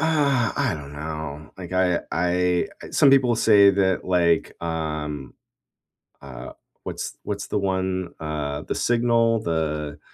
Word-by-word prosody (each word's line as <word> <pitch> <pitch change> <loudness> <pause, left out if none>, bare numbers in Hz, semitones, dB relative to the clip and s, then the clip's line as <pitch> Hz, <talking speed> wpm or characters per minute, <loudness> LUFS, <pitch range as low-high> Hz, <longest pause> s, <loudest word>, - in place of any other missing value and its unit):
Uh, 140 -6 +2
I - - +1
don't 75 -2 -9
know. 75 0 -6
Like 90 -1 -8
I 90 -1 +2
I 90 0 +1 0.2
some 140 - +5
people 125 -4 +4
say 105 -3 +6
that 95 -1 +1
like, 85 -3 +2
um 75 -3 -4 0.9
uh 65 -2 -9 0.3
what's - - -5
what's - - -4
the 105 - 0
one, 95 -1 -2
uh, 75 -2 -3
the - - -4
signal, 115 -1 +2
the 75 -5 -2
90 Hz, 130 wpm, -24 LUFS, 75-105 Hz, 0.9 s, say